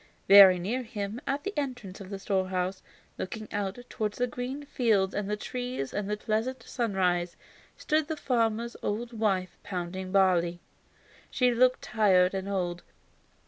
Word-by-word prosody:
Very 195 -2 +10
near 215 +9 -2
him, 215 -1 -5
at 280 +1 -1
the 405 - -3
entrance 245 -10 -4
to 195 - -8
the 195 +1 -6
storehouse, 185 -1 -1 0.4
looking 215 +3 -5
out 200 0 -2
towards 210 -1 -3
the 245 - +2
green 250 +3 -5
fields 215 -8 +1
and 205 -1 -2
the 210 - -1
trees 250 - -4
and 205 -1 -2
the 210 - -1
pleasant 225 +4 -2
sunshine, 185 -7 0 0.5
stood 310 -1 0
the 315 -1 -3
farmer's 235 -3 0
old 235 +3 -3
wife 195 -5 -1
pounding 185 0 -5
barley. 180 -3 +3 0.7
She 250 -1 +2
looked 255 +2 +3
tired 190 -4 +3
and 195 0 -3
old. 175 -3 -2
205 Hz, 150 wpm, -28 LUFS, 190-245 Hz, 0.7 s, Very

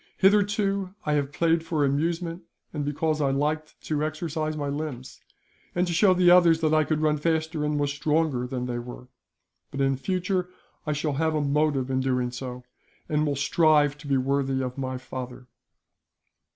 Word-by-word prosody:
Hitherto 200 -1 +2
I 150 - +1
have 145 -1 0
played 165 +2 +1
for 160 -3 0
amusement, 165 +5 -1 0.3
and 150 -2 -2
because 150 +2 -1
I 140 - +2
liked 150 +3 -2
to 150 -1 -1
exercise 155 0 -3
my 145 -1 -2
limbs, 140 -3 -5 0.5
and 175 +1 +2
to 175 - -2
show 185 +2 +4
the 180 -1 +5
others 175 -2 +6
that 155 -1 +2
I 155 0 +4
could 155 0 -1
run 155 -1 +2
faster 160 0 0
and 150 0 0
was 145 -1 0
stronger 150 -3 0
than 125 -1 -3
they 120 -1 -3
were; 125 +1 -9 0.6
but 140 - -7
in 135 -1 +2
future 180 +3 -1 0.4
I 150 - +1
shall 150 0 -1
have 160 +2 0
a - - +1
motive 140 -2 +1
in 130 - +1
doing 125 -2 0
so, 125 0 -7 0.4
and 150 0 +1
will 145 - 0
strive 145 0 +3
to 145 - -10
be 140 -1 +2
worthy 135 0 0
of 125 -1 -4
my 130 -1 -3
father." 125 -1 -8
150 Hz, 180 wpm, -26 LUFS, 135-165 Hz, 0.6 s, others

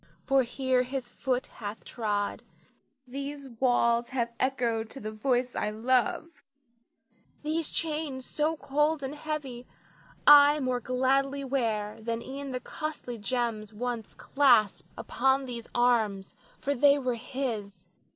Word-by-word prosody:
For 275 0 +4
here 260 +1 +1
his 250 -1 -4
foot 255 -1 -1
hath 210 -1 -8
trod; 205 -3 -2 0.6
these 280 +2 -6
walls 235 -2 +3
have 235 -3 -2
echoed 235 -4 0
to 270 - -8
the 215 -2 -5
voice 245 +3 0
I 210 - 0
love; 255 +8 0 1.0
these 310 +1 -1
chains 300 -5 -2
so 310 +2 -1
cold 295 +2 0
and 265 +1 -3
heavy 295 -5 -5 0.6
I 290 0 +8
more 255 -3 0
gladly 270 +3 +1
wear 225 -6 -1
than 230 +1 -3
e'en 275 +1 -6
the 255 -1 -3
costly 295 -5 -5
gems 220 -1 -2
once 235 -1 -4
clasped 240 -8 +3
upon 265 +2 +1
these 235 -2 -7
arms, 220 -5 +2 0.2
for 285 - -1
they 280 +2 +5
were 255 -3 -1
his. 225 -7 -5
255 Hz, 130 wpm, -29 LUFS, 235-275 Hz, 1.0 s, I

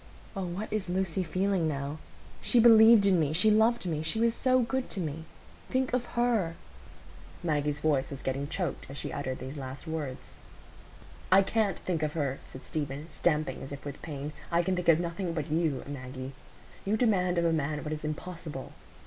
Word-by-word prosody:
Oh, 195 -1 -2
what 180 +6 -4
is 210 -4 -1
Lucy 185 0 0
feeling 185 0 +1
now? 145 0 -3 0.4
She 245 - +3
believed 225 -2 +8
in 190 -3 +4
me—she 160 +8 +3
loved 220 +1 +3
me—she 160 +4 -1
was 230 0 +3
so 255 +1 +3
good 255 +2 -2
to 200 - -4
me. 160 -1 -4 0.4
Think 260 -1 0
of 250 -1 +1
her——" 225 -9 +2 0.9
Maggie's 150 -2 0
voice 145 -4 +2
was 140 -1 -7
getting 135 +2 -1
choked 175 +3 -3
as 140 - -7
she - - -4
uttered 130 -2 -3
these 130 +4 -7
last 135 +1 -7
words. 155 -5 -5 0.9
"I 195 +1 +7
can't 205 -2 +1
think 170 -4 -2
of 155 -1 -1
her," 140 -4 -1
said 130 - -10
Stephen, 150 0 -4
stamping 150 -3 0
as 135 - -8
if 140 0 -8
with 145 -1 -6
pain. 150 -1 -5 0.2
"I 170 +1 +3
can 190 +1 0
think 180 -1 0
of 165 -1 +6
nothing 170 +1 -2
but 155 -2 -3
you, 155 -5 +1
Maggie. 130 -1 -6 0.5
You 210 +2 +1
demand 185 -7 +2
of 170 - +2
a 165 - +3
man 150 -1 -1
what 155 - -3
is 155 - -6
impossible. 155 -2 -5
165 Hz, 185 wpm, -30 LUFS, 145-195 Hz, 0.9 s, believed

